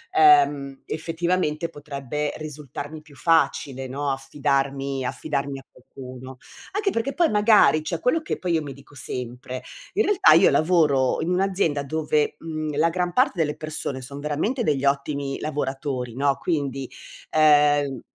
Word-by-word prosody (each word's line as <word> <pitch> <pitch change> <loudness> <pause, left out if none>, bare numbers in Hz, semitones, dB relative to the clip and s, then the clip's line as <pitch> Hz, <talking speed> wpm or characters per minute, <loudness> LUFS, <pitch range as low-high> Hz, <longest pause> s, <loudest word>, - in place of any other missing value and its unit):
ehm 355 - +4
effettivamente, 165 0 -1
potrebbe 145 -1 -4
risultarmi 150 0 -7
più 150 -2 -18
facile, 140 -3 +1
no, 140 +2 -3
affidarmi 135 -1 -1
affidarmi 140 0 -3
a 135 - -16
qualcuno. 130 0 -11 0.3
Anche 405 +1 0
perché 270 -4 -2
poi 340 +3 +3
magari 205 -8 +5
cioè 165 +1 -3
quello 315 - +1
che - - -3
poi 180 -2 -1
io 160 -2 +1
mi 140 -2 -7
dico 140 +1 -17
sempre: 125 -1 -6 0.4
in 430 +3 +2
realtà 405 -1 +5
io - - +6
lavoro 155 -6 +2
in 160 - -2
un'azienda 180 -5 +1
dove, 150 +1 0
mhmm, 155 -2 -4
la 165 +2 +3
gran 180 +1 -1
parte 255 - +3
delle 150 -2 +1
persone 155 -4 -4
son 140 +3 -8
veramente 160 - -1
degli 140 -5 0
ottimi 140 0 -1
lavoratori, 135 -4 -3
no, 140 +1 +1
quindi, 140 -6 -2 0.4
ehm 145 -3 +4
150 Hz, 145 wpm, -24 LUFS, 135-165 Hz, 0.4 s, io